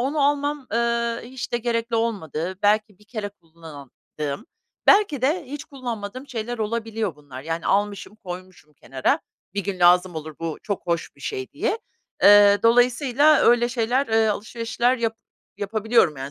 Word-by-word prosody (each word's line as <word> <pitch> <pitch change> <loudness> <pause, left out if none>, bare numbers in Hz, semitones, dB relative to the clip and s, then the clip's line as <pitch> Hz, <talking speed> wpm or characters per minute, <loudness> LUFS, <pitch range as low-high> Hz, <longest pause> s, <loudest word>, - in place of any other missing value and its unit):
onu 280 +4 0
almam, 290 -1 0
eee, 235 0 0
hiç 260 +1 -7
de 240 - +1
gerekli 230 0 -1
olmadığı, 190 -5 -3
belki 210 -1 +2
bir 210 - -21
kere 215 -1 -5
kullandığım, 160 - -9 0.4
belki 395 - +4
de 310 +6 +1
hiç 290 +3 -7
kullanmadığım 255 -3 -6
şeyler 240 -1 -4
olabiliyor 220 -4 -2
bunlar. 140 -3 -11
Yani, 165 +2 -4
almışım, 205 +1 -1
koymuşum 185 -5 -10
kenara, 130 -1 -1 0.4
bir 200 -2 -2
gün 195 -2 -3
lazım 180 +1 +5
olur 155 0 -6
bu 165 -2 -4
çok 200 -2 -4
hoş 170 -1 -2
bir - - -20
şey 395 -2 -5
diye. 455 - -1 0.4
Eee, 205 0 +8
dolayısıyla 245 +5 +4
öyle 240 0 +4
şeyler, 245 +3 0
eee, 225 0 +3
alışverişler 230 +4 -1
yap 225 -2 -2 0.4
yapabiliyorum, 215 - +1
yani, 135 +1 -6
220 Hz, 150 wpm, -23 LUFS, 185-245 Hz, 0.4 s, Eee